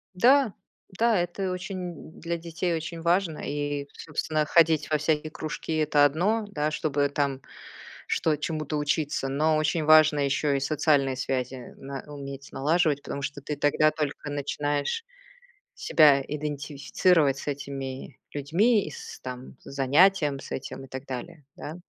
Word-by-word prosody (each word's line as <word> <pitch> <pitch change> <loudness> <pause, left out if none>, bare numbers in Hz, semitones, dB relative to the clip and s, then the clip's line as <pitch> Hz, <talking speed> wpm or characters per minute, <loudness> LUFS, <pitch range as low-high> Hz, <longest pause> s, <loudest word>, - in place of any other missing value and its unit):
Да, 255 +4 +5 0.5
да, 230 -2 +3
это 175 +2 -2
очень 180 -3 -6
для 170 0 -2
детей 170 +1 -2
очень 165 +1 -4
важно, 170 -1 +1
и, 145 -1 -3
собственно, 155 0 -2
ходить 160 -1 +3
во 155 - +3
всякие 155 0 0
кружки- 155 +1 -5
это 150 -1 +4
одно, 185 +10 +2
да, 150 -5 -1
чтобы 145 -2 0
там 140 -2 -1 0.7
что 155 -2 +1
чему-то 155 0 -3
учиться, 145 -1 -1
но 155 +3 +2
очень 155 +1 +1
важно 155 -1 +6
ещё 140 +1 +1
и 140 - +1
социальные 140 -2 +2
связи 130 -1 -3
на 135 0 -7
уметь 140 -1 -8
налаживать, 150 0 +1
потому 140 - -5
что 140 +1 -4
ты 145 +1 -4
тогда 145 +2 +3
только 150 -1 -4
начинаешь 145 - -2 0.7
себя 145 -4 +5
идентифицировать 150 +1 +1
с - - -9
этими 135 -2 -5
людьми, 190 - +2
и - - -6
с, - - -9
там, 125 +1 -8
с - - -25
занятием 145 +2 +3
с - - -11
этим 135 0 -6
и - - -15
так 130 +1 -7
далее, 145 +3 -7
да? 155 - -7
150 Hz, 150 wpm, -27 LUFS, 140-165 Hz, 0.7 s, важно